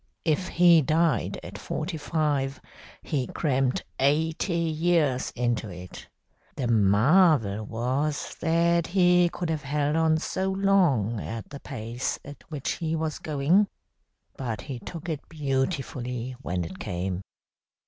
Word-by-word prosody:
If 165 Hz, +3 st, +1 dB
he 175 Hz, -2 st, +6 dB
died 160 Hz, +2 st, +1 dB
at -, -, -8 dB
forty 160 Hz, +3 st, -4 dB
five, 145 Hz, -3 st, -1 dB, 0.4 s
he 135 Hz, -5 st, -1 dB
crammed 135 Hz, -4 st, 0 dB, 0.2 s
eighty 160 Hz, +5 st, +1 dB
years 160 Hz, -4 st, +1 dB
into 120 Hz, -3 st, -1 dB
it. 90 Hz, 0 st, -10 dB, 0.5 s
The 130 Hz, -, -2 dB
marvel 110 Hz, -, +4 dB
was 130 Hz, +6 st, -2 dB
that 170 Hz, +1 st, +2 dB
he 180 Hz, -1 st, +4 dB
could 170 Hz, -1 st, -3 dB
have 155 Hz, -2 st, -1 dB
held 145 Hz, +2 st, 0 dB
on 160 Hz, -1 st, +3 dB
so 190 Hz, +4 st, -2 dB
long 180 Hz, -, +2 dB
at 115 Hz, -1 st, -6 dB
the 140 Hz, -, -7 dB
pace 120 Hz, -2 st, -4 dB
at 145 Hz, -2 st, -10 dB
which 145 Hz, -4 st, -3 dB
he 165 Hz, -1 st, -2 dB
was 160 Hz, -1 st, -2 dB
going. 155 Hz, +7 st, +2 dB, 0.7 s
But 115 Hz, -6 st, -4 dB
he 135 Hz, -5 st, -6 dB
took 165 Hz, +6 st, -8 dB
it 155 Hz, -4 st, -4 dB
beautifully 130 Hz, -4 st, -2 dB
when 90 Hz, -7 st, -2 dB
it 95 Hz, +3 st, -8 dB
came. 90 Hz, -1 st, -3 dB
145 Hz, 130 wpm, -26 LUFS, 125-165 Hz, 0.7 s, he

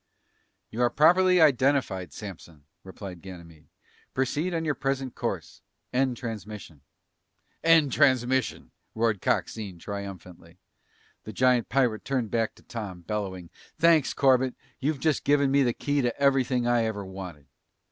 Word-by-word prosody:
"You 115 Hz, -, -3 dB
are 120 Hz, -, +4 dB
properly 180 Hz, +6 st, +5 dB
identified, 130 Hz, -, +2 dB
Samson," 85 Hz, -6 st, -10 dB, 0.2 s
replied 95 Hz, -2 st, -9 dB
Ganymede. 85 Hz, -4 st, -12 dB, 0.5 s
"Proceed 145 Hz, +7 st, 0 dB
on 165 Hz, -1 st, -2 dB
your 150 Hz, -, +1 dB
present 135 Hz, -2 st, -2 dB
course. -, -, -5 dB, 0.3 s
End 130 Hz, -1 st, +1 dB
transmission." 105 Hz, -, -7 dB, 0.8 s
"End 165 Hz, -4 st, +5 dB
transmission!" 130 Hz, -2 st, +1 dB, 0.2 s
roared 110 Hz, -4 st, +1 dB
Coxine 100 Hz, -5 st, -2 dB
triumphantly. 95 Hz, -2 st, -8 dB, 0.7 s
The 110 Hz, -, -8 dB
giant 125 Hz, +1 st, +2 dB
pirate 120 Hz, -4 st, +1 dB
turned 125 Hz, -6 st, -2 dB
back 115 Hz, -1 st, 0 dB
to -, -, -20 dB
Tom, 100 Hz, -6 st, -7 dB
bellowing, 95 Hz, -3 st, -5 dB, 0.3 s
"Thanks, 165 Hz, -4 st, +4 dB
Corbett. 130 Hz, -2 st, +3 dB, 0.2 s
You've 145 Hz, +1 st, -1 dB
just 155 Hz, -1 st, +1 dB
given 140 Hz, -1 st, +3 dB
me 140 Hz, +1 st, +4 dB
the 125 Hz, -3 st, +3 dB
key 145 Hz, +4 st, -1 dB
to 120 Hz, 0 st, -2 dB
everything 130 Hz, -3 st, +2 dB
I 120 Hz, -1 st, +2 dB
ever 105 Hz, -3 st, -3 dB
wanted." 95 Hz, -6 st, -9 dB
120 Hz, 135 wpm, -27 LUFS, 100-135 Hz, 0.8 s, properly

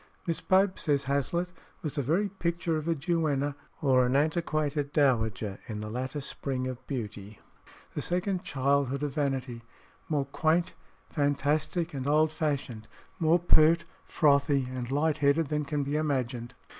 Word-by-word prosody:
"Miss 165 Hz, -2 st, -2 dB
Pope," 190 Hz, 0 st, +3 dB
says 145 Hz, -3 st, +1 dB
Hazlitt, 140 Hz, +6 st, 0 dB, 0.3 s
"was 155 Hz, -, -3 dB
the 145 Hz, -, -1 dB
very 170 Hz, -, +1 dB
picture 170 Hz, -3 st, -2 dB
of 155 Hz, 0 st, -3 dB
a 165 Hz, -, +2 dB
duenna 145 Hz, -3 st, 0 dB, 0.3 s
or 130 Hz, -3 st, +5 dB
an 125 Hz, -, +1 dB
antiquated 150 Hz, -1 st, 0 dB
dowager 110 Hz, -8 st, +1 dB
in 105 Hz, -2 st, -5 dB
the 105 Hz, 0 st, -5 dB
latter 130 Hz, +5 st, -3 dB
spring 135 Hz, -1 st, -3 dB
of 130 Hz, 0 st, -6 dB
beauty 105 Hz, -5 st, -6 dB, 0.5 s
the -, -, -3 dB
second 180 Hz, +1 st, -1 dB
childhood 140 Hz, 0 st, 0 dB
of 145 Hz, -2 st, -2 dB
vanity; 130 Hz, -4 st, -2 dB, 0.5 s
more 145 Hz, -3 st, +1 dB
quaint, 160 Hz, +5 st, +1 dB, 0.4 s
fantastic, 150 Hz, +3 st, 0 dB
and 135 Hz, -1 st, -4 dB
old 155 Hz, +1 st, +3 dB
fashioned, 140 Hz, -8 st, -3 dB, 0.3 s
more 165 Hz, +1 st, +4 dB
pert, 170 Hz, -1 st, +4 dB, 0.2 s
frothy, 140 Hz, -3 st, +3 dB
and 125 Hz, -1 st, -4 dB
light 155 Hz, +2 st, +1 dB
headed 140 Hz, +1 st, +3 dB
than 150 Hz, -1 st, -1 dB
can 145 Hz, 0 st, -1 dB
be 140 Hz, +2 st, -2 dB
imagined." 130 Hz, -5 st, -2 dB
145 Hz, 150 wpm, -29 LUFS, 130-160 Hz, 0.5 s, or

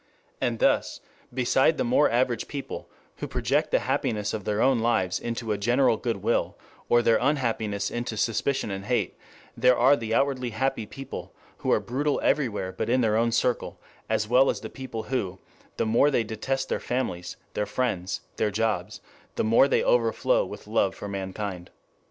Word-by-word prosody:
And 120 Hz, -1 st, 0 dB
thus, -, -, +1 dB, 0.3 s
beside 130 Hz, +5 st, +2 dB
the -, -, +1 dB
more 130 Hz, +5 st, +3 dB
average 120 Hz, 0 st, 0 dB
people 140 Hz, -1 st, -6 dB, 0.3 s
who -, -, -4 dB
project -, -, 0 dB
the -, -, +3 dB
happiness 105 Hz, -2 st, -1 dB
of 110 Hz, -3 st, -4 dB
their 105 Hz, 0 st, 0 dB
own 130 Hz, 0 st, +4 dB
lives 95 Hz, -6 st, +1 dB
into 115 Hz, -1 st, -3 dB
a 105 Hz, -, -1 dB
general 120 Hz, +3 st, +3 dB
good 110 Hz, -3 st, -3 dB
will, -, -, 0 dB, 0.3 s
or 120 Hz, 0 st, +4 dB
their 115 Hz, -, +4 dB
unhappiness 115 Hz, -7 st, 0 dB
into 120 Hz, -2 st, -3 dB
suspicion 115 Hz, +2 st, 0 dB
and 95 Hz, 0 st, -5 dB
hate, 125 Hz, +1 st, 0 dB, 0.4 s
there 125 Hz, 0 st, +4 dB
are 130 Hz, +4 st, +6 dB
the 115 Hz, -3 st, -2 dB
outwardly 130 Hz, -3 st, +1 dB
happy 135 Hz, -5 st, 0 dB
people 135 Hz, +3 st, -8 dB, 0.2 s
who -, -, -1 dB
are -, -, +4 dB
brutal 145 Hz, +4 st, -1 dB
everywhere 105 Hz, -10 st, 0 dB
but 95 Hz, -, -3 dB
in 125 Hz, +1 st, +3 dB
their 110 Hz, -2 st, +2 dB
own 115 Hz, +1 st, +2 dB
circle, 120 Hz, +1 st, 0 dB, 0.3 s
as 105 Hz, -, +1 dB
well 125 Hz, +4 st, +5 dB
as -, -, -2 dB
the -, -, -7 dB
people 130 Hz, -5 st, -6 dB
who, 100 Hz, -8 st, -2 dB, 0.4 s
the -, -, +1 dB
more 115 Hz, +6 st, +4 dB
they 125 Hz, -5 st, +2 dB
detest 130 Hz, +5 st, -2 dB
their -, -, 0 dB
families, 90 Hz, -9 st, -3 dB, 0.2 s
their 105 Hz, -, -1 dB
friends, 95 Hz, -8 st, -2 dB, 0.2 s
their 105 Hz, -, +1 dB
jobs, 105 Hz, -2 st, -1 dB, 0.3 s
the -, -, 0 dB
more 115 Hz, +5 st, +5 dB
they -, -, +2 dB
overflow 115 Hz, -2 st, +2 dB
with -, -, -8 dB
love 105 Hz, -3 st, +1 dB
for 105 Hz, -, -7 dB
mankind. 95 Hz, -2 st, -5 dB
115 Hz, 180 wpm, -26 LUFS, 105-130 Hz, 0.4 s, are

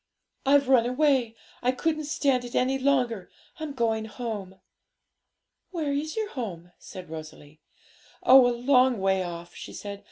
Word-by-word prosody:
'I've 280 Hz, -1 st, +5 dB
run 250 Hz, -3 st, +4 dB
away; 255 Hz, -3 st, +2 dB, 0.3 s
I 250 Hz, -, +2 dB
couldn't 310 Hz, +3 st, -1 dB
stand 275 Hz, -4 st, +1 dB
it 245 Hz, -, -8 dB
any 265 Hz, +2 st, +1 dB
longer. 250 Hz, -8 st, +1 dB, 0.3 s
I'm 310 Hz, -2 st, -4 dB
going 225 Hz, -3 st, 0 dB
home.' 210 Hz, -5 st, -6 dB, 1.1 s
'Where 315 Hz, -6 st, -2 dB
is 300 Hz, +3 st, -3 dB
your 435 Hz, -2 st, -1 dB
home?' 180 Hz, -9 st, -6 dB
said 185 Hz, -1 st, -10 dB
Rosalie. 155 Hz, -1 st, -10 dB, 0.6 s
'Oh, 255 Hz, -1 st, +8 dB
a -, -, +2 dB
long 255 Hz, -1 st, +3 dB
way 190 Hz, 0 st, +2 dB
off.' 170 Hz, 0 st, -7 dB
she -, -, -9 dB
said. 200 Hz, -1 st, -7 dB
245 Hz, 150 wpm, -26 LUFS, 195-275 Hz, 1.1 s, Oh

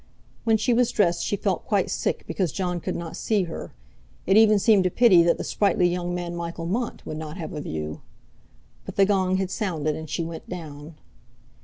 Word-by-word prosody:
When 225 Hz, -1 st, +4 dB
she 240 Hz, +3 st, +1 dB
was 240 Hz, 0 st, +3 dB
dressed 175 Hz, -5 st, +1 dB
she -, -, 0 dB
felt -, -, -2 dB
quite -, -, +1 dB
sick -, -, -1 dB
because 185 Hz, -6 st, -1 dB
Jon 180 Hz, -2 st, -2 dB
could -, -, -4 dB
not 170 Hz, -1 st, -5 dB
see 210 Hz, -3 st, +1 dB
her; 165 Hz, -, -7 dB, 0.5 s
it 190 Hz, -, +3 dB
even 215 Hz, -1 st, +6 dB
seemed 200 Hz, -2 st, +4 dB
a -, -, 0 dB
pity 195 Hz, -4 st, +6 dB
that 170 Hz, 0 st, +3 dB
the -, -, -4 dB
sprightly 195 Hz, -3 st, +2 dB
young 175 Hz, 0 st, -2 dB
man 175 Hz, -1 st, -4 dB
Michael 170 Hz, 0 st, -5 dB
Mont 230 Hz, +8 st, -3 dB
would 155 Hz, -, -5 dB
not 155 Hz, +2 st, -6 dB
have 165 Hz, -, -6 dB
a 150 Hz, -, -4 dB
view. 75 Hz, -, -5 dB, 0.8 s
But -, -, -8 dB
the 195 Hz, -, +5 dB
gong 190 Hz, -2 st, +2 dB
had 190 Hz, -1 st, -2 dB
sounded, 160 Hz, -9 st, -1 dB
and 160 Hz, -1 st, -7 dB
she 170 Hz, -, -2 dB
went 165 Hz, 0 st, -7 dB
down. 155 Hz, -3 st, -8 dB
180 Hz, 205 wpm, -25 LUFS, 165-200 Hz, 0.8 s, even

